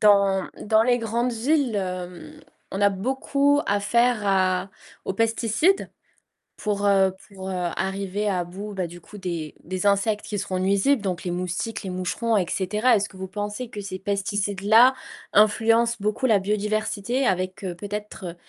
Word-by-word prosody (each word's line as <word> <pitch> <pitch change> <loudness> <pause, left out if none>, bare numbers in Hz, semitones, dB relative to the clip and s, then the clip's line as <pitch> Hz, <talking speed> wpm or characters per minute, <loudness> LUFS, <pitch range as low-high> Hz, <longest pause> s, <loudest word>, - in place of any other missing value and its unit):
Dans 200 -2 +4 0.2
dans 220 +1 +4
les 245 +1 +3
grandes 235 +2 -1
villes, 255 0 +1
hem, 185 - -5 0.3
on 195 - -3
a 205 - +6
beaucoup 270 +7 +1
à 205 0 +1
faire 235 +3 +2
à 185 -1 +2 0.3
aux - - -2
pesticides 225 - +1 0.7
pour 205 -1 -1
heu 195 -2 +4 0.2
pour 190 -1 -7
heu, 190 - -3 0.2
arriver 195 +2 -2
à 180 -3 0
bout, 195 +4 -7
bah, 185 -3 -2
du 175 +1 -11
coup 205 +4 -13
des 170 -5 -4
des 185 +3 -4
insectes 205 +1 +1
qui 210 - -4
seront 185 -1 -2
nuisibles, 200 +8 +2
donc 185 -3 -3
les 180 - -2
moustiques, 180 +6 -3
les 190 - -4
moucherons, 185 +5 -1
et 185 - +2
cetera. 210 +6 +2
Est-ce 200 0 -1
que - - -17
vous 190 0 -5
pensez 210 +4 -4
que 210 - -7
ces 190 -1 -6
pesticides-là 205 +4 +3 0.4
influencent 225 +2 +4
beaucoup 210 +5 0
la 220 -5 +4
biodiversité 210 +4 -1
avec, 185 -1 -1
heu, 180 -2 -3
peut-être, 205 -2 -6
205 Hz, 165 wpm, -24 LUFS, 190-225 Hz, 0.7 s, a